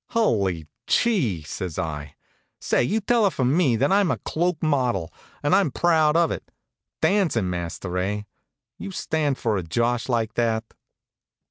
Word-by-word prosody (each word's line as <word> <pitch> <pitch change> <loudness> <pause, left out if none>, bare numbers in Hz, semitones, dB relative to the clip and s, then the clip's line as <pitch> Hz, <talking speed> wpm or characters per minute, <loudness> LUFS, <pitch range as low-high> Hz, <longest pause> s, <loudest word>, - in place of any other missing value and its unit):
"Hully 100 - +1 0.2
chee!" 130 - +1
says 85 +2 -5
I. 75 -4 -4 0.4
"Say, - - +1
you 215 - 0
tell 230 +1 +3
her - - +4
from 130 -4 0
me 155 -9 +3
that 135 +8 +1
I'm 195 -2 +4
a - - 0
cloak 175 0 -2
model, 125 - 0 0.3
an' 185 +4 +3
proud 160 +1 +3
of 170 -2 +3
it. - - -6 0.5
Dancin' 155 - +2
master, 90 +1 -4
eh? 100 +3 -1
Do - - -13 0.6
you - - -4
stand 155 -7 -1
for 110 -3 0
a - - -1
josh 120 +9 0
like 115 -3 0
that?" 115 -2 0
125 Hz, 155 wpm, -24 LUFS, -, 0.6 s, her